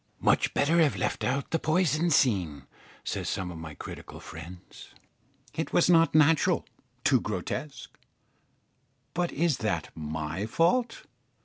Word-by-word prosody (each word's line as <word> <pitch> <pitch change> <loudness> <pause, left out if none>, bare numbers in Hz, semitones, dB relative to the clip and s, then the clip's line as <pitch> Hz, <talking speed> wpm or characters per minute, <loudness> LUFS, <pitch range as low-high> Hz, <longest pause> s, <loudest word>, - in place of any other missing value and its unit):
Much - - +2
better 160 +4 +3
have 155 -4 +4
left - - -2
out 135 +2 -1
the 165 - +1
poison 160 0 +2
scene, 90 - +1 0.4
say - - -3
some 90 -1 -3
of 85 - -8
my 80 -2 -8
critical - - -9
friends. 85 +3 -11 0.6
It 160 - -4
was 175 - +4
not 165 -2 +4
natural 155 0 +4 0.4
too - - +4
grotesque; - - -5 1.2
but 175 0 -1
is 160 -2 +1
that 90 -8 -2
my 80 +5 -4
fault? 230 - +1
140 Hz, 130 wpm, -28 LUFS, -, 1.2 s, have